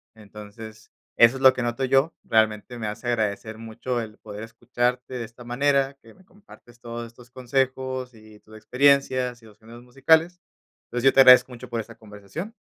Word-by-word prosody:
Entonces, 105 +1 -12 0.3
eso 120 +3 +6
es - - -10
lo 130 -1 +7
que 125 - -4
noto 120 +3 -2
yo. 135 +5 +2
Realmente 110 +2 0
me 115 - -5
hace 105 +3 -6
agradecer 110 -1 -2
mucho 115 +2 -5
el 110 -2 -8
poder 105 0 -9
escucharte 120 +2 -3
de 120 - -4
esta 115 +2 -12
manera, 135 +3 0
que 115 - -17
me 190 - -22
compartes 180 - -19
todos 120 0 -7
estos 120 +1 -18
consejos, 130 0 -2
y 110 -1 -17
tus 110 - -17
experiencias, 130 0 +1
y - - -18
los 105 -1 -18
géneros 115 +2 -14
musicales. 160 +8 +2 0.5
Pues, 120 - -2
yo 135 - +5
te 135 - +7
agradezco 125 0 +7
mucho 125 +1 -10
por 120 -1 -3
esa 115 +1 -13
conversación. 110 - -9
120 Hz, 185 wpm, -24 LUFS, 110-130 Hz, 0.5 s, lo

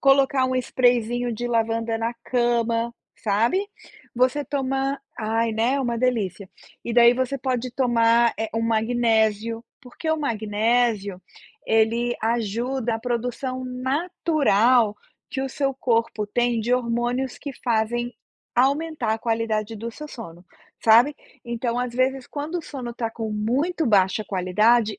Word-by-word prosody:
Colocar 275 -1 +4
um 255 - -1
sprayzinho 245 -1 +1
de 240 +2 -3
lavanda 225 -1 0
na 230 +1 -1
cama, 235 -1 +1 0.2
sabe? 230 - +1 0.5
Você 255 +4 +2
toma 270 0 -1 0.2
ai, 225 +1 0
né? 245 +5 +1
Uma 240 -2 -1
delícia. 210 -6 -1 0.4
E 235 - -3
daí 240 0 +7
você 260 +2 -1
pode 255 -1 -2
tomar, 235 -2 +3
eh, 220 -1 -1
o 225 - 0
magnésio. 225 -1 +1 0.2
Porque 285 +5 -5
o 315 - +2
magnésio, 220 -5 0 0.5
ele 230 +2 +2
ajuda 235 +2 -1
a - - -3
produção 250 +2 -3
natural 255 - +2 0.3
que 265 - -3
o 270 - -2
seu 275 -1 -1
corpo 230 -4 0
tem 240 +2 0
de 240 +3 +2
hormônios 245 +1 -1
que 280 -1 -6
fazem 240 +1 0 0.4
aumentar 275 -2 +1
a - - -6
qualidade 225 -1 -1
do 230 +2 -5
seu 300 +6 -9
sono, 180 - -10 0.4
sabe? 235 +6 +6 0.3
Então, 235 0 -2
às 245 -1 -2
vezes, 260 0 0
quando 300 +4 -4
o - - -7
sono 255 -6 -6
está 230 -1 -3
com 225 -1 -5
muito 275 +11 0
baixa 200 -1 +3
qualidade, 210 +3 +2
235 Hz, 135 wpm, -24 LUFS, 225-255 Hz, 0.5 s, daí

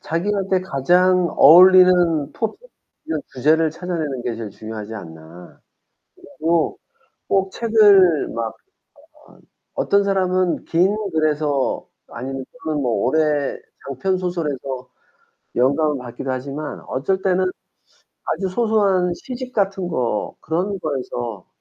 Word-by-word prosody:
자기한테 190 +2 -1
가장 180 +3 +2
어울리는 180 -1 +6
토픽 220 -2 -3 0.5
이런 160 -2 -3
주제를 155 +5 +2
찾아내는 160 -6 -4
게 120 -2 -3
제일 110 -2 -6
중요하지 110 +1 -8
않나. 80 -2 -12 0.6
그리고 160 +2 -1 0.5
꼭 195 -1 +1
책을 205 -8 +4
막 115 0 -2
아, - - -11 1.2
어떤 200 0 +2
사람은 185 -2 0
긴 185 +5 +2 0.2
글에서 150 -3 0 0.2
아니면 130 +2 -6 0.2
좀 155 -2 -1
뭐 125 -3 0
오래 145 +6 +1 0.3
장편소설에서 145 -5 -3 0.7
영감을 140 +4 +2
받기도 125 +1 -6
하지만 140 +3 -5
어떨 165 +9 -1
때는 185 -1 +2 0.8
아주 190 +4 -2
소소한 195 -4 +1
시집 255 +5 -8
같은 195 -4 -1
거 120 -10 -2
그런 185 +6 -2
거에서 120 - -5
160 Hz, 245 characters per minute, -20 LUFS, 135-185 Hz, 1.2 s, 어울리는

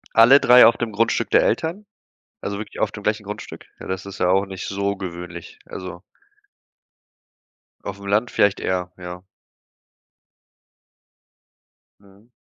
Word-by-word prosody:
Alle 115 +5 +8
3 125 -2 +7
auf 115 - +5
dem 120 -2 -3
Grundstück 115 +2 0
der - - +4
Eltern? 175 +6 -1 0.6
Also, 100 - -4
wirklich 110 - -8
auf - - +1
dem - - -9
gleichen - - -1
Grundstück? - - -8
Ja, - - -10
das 95 +1 -4
ist 100 - -9
ja 90 - +2
auch 95 +1 +2
nicht 95 -1 -7
so 100 0 -2
gewöhnlich. 85 -2 -8
Also 90 -1 -8 1.8
Aufm 100 0 -7
Land 105 +4 +1
vielleicht 100 -1 +2
eher, 90 -1 -2
ja. 90 0 -8 2.8
Mhm. 100 +3 -22
100 Hz, 135 wpm, -22 LUFS, 90-110 Hz, 2.8 s, Alle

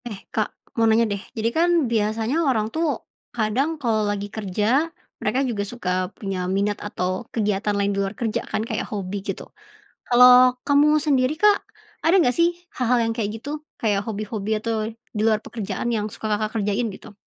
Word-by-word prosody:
Eh, 220 -4 -5 0.2
Kak, - - 0 0.3
mau 225 -1 +4
nanya 225 +1 +4
deh, 200 - -4 0.2
jadi 225 +1 +1
kan 340 +2 +4 0.2
biasanya 220 +3 0
orang 220 -4 +1
tuh, 330 +1 0 0.5
kadang 230 +7 +1
kalau 225 -4 +1
lagi 205 0 -2
kerja, 220 - +1 0.3
mereka 260 - 0
juga 210 -4 -2
suka 240 -7 -4 0.3
punya 195 -4 -4
minat 200 +2 0
atau 185 -3 -2 0.2
kegiatan 210 -1 0
lain 200 0 +1
di - - -4
luar 195 +1 -3
kerja 225 -3 -1
kan, - - -1
kayak 220 -1 -3
hobi 200 -2 -4
gitu. 195 -1 -5 0.6
Kalau 250 +1 +7 0.2
kamu 285 +1 +5
sendiri, 270 -3 +2
Kak, 415 -1 +4 0.4
ada 330 - +4
nggak 250 -6 +2
sih 335 0 +5 0.3
hal-hal 250 -1 +2
yang - - 0
kayak 210 -3 -1
gitu? 285 - -7 0.3
Kayak 205 -3 +1
hobi-hobi 215 -1 -4
atau 230 +1 -2 0.4
di - - -1
luar 215 -1 +3
pekerjaan, 225 +1 -4
yang 210 -1 -1
suka, 220 - -5
Kakak, 215 +1 -2
kerjain, 205 +3 0
gitu? 200 - -12
220 Hz, 175 wpm, -23 LUFS, 205-250 Hz, 0.6 s, Kalau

